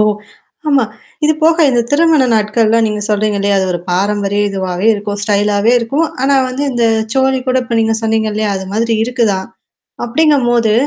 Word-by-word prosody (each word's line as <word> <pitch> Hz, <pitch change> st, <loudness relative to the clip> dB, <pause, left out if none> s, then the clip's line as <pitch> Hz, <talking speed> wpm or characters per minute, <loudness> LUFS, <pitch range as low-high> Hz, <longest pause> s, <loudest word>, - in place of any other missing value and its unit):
ஓ! -, -, +3 dB, 0.6 s
ஆமா. 275 Hz, -4 st, +3 dB, 0.4 s
இது 310 Hz, -, +4 dB
போக 325 Hz, 0 st, +4 dB
இந்த 240 Hz, -2 st, +2 dB
திருமண 310 Hz, -1 st, +3 dB
நாட்கள்லாம் 220 Hz, +1 st, +2 dB
நீங்க 210 Hz, -1 st, -3 dB
சொல்றீங்க 210 Hz, 0 st, 0 dB
இல்லயா, 200 Hz, 0 st, +1 dB
அது 190 Hz, -, 0 dB
ஒரு 175 Hz, -, -2 dB
பாரம்பரிய 205 Hz, +2 st, 0 dB
இதுவாவே 190 Hz, 0 st, -3 dB
இருக்கும். 205 Hz, 0 st, -5 dB
ஸ்டைலாவே 205 Hz, +1 st, +1 dB
இருக்கும். 275 Hz, +8 st, -1 dB, 0.2 s
ஆனா 275 Hz, +1 st, +2 dB
வந்து 255 Hz, +3 st, -4 dB
இந்த 240 Hz, -1 st, 0 dB, 0.3 s
சோழி 265 Hz, 0 st, +1 dB
கூட 255 Hz, -, +1 dB
இப்ப 235 Hz, -1 st, -2 dB
நீங்க 225 Hz, 0 st, +1 dB
சொன்னீங்க 220 Hz, -1 st, 0 dB
இல்லையா? 215 Hz, 0 st, -1 dB
அது 190 Hz, -, -5 dB
மாதிரி 230 Hz, +2 st, 0 dB
இருக்குதான் 225 Hz, -6 st, -1 dB, 0.6 s
அப்டிங்கும்போது. 240 Hz, -5 st, +2 dB
225 Hz, 165 wpm, -14 LUFS, 205-255 Hz, 0.6 s, இது